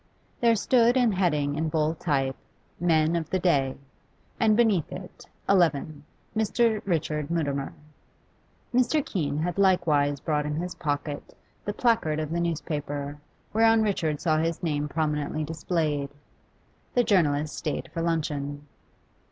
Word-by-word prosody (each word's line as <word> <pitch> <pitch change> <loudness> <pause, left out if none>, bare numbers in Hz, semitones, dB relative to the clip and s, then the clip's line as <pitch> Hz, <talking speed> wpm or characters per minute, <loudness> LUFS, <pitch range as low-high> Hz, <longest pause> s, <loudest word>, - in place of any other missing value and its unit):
There 230 -1 +4
stood 240 +3 +3
the 245 -3 +4
heading 150 -6 +1
in 160 +1 -1
bold 155 +1 0
type, 135 -5 0 0.4
'MEN 160 -1 +3
OF 160 -2 -2
THE 190 - +1
DAY,' 140 -8 +1 0.6
and 220 -2 +4
beneath 215 -9 +2
it 185 0 -9 0.2
'XI. 155 -6 +2 0.3
Mr. 220 0 +2
Richard 155 -4 -1
Mutimer.' 145 -5 -2 1.0
Mr. 255 +4 +2
Keene 145 -7 -2
had 175 +4 -2
likewise 155 -7 +3
brought 150 0 -1
in 150 - -2
his 180 +3 -3
pocket 145 -2 -4 0.3
the 205 - -2
placard 220 -11 +1
of 155 0 -3
the 170 - 0
newspaper, 145 -3 -3 0.3
whereon 225 0 +5
Richard 165 -8 0
saw 155 -3 +2
his 165 +1 -1
name 150 -3 -1
prominently 150 0 -1
displayed. 150 -2 -1 0.9
The 245 - +5
journalist 155 -8 +2
stayed 150 - -4
for 165 - -2
luncheon. 145 -3 -2
160 Hz, 135 wpm, -26 LUFS, 150-190 Hz, 1.0 s, whereon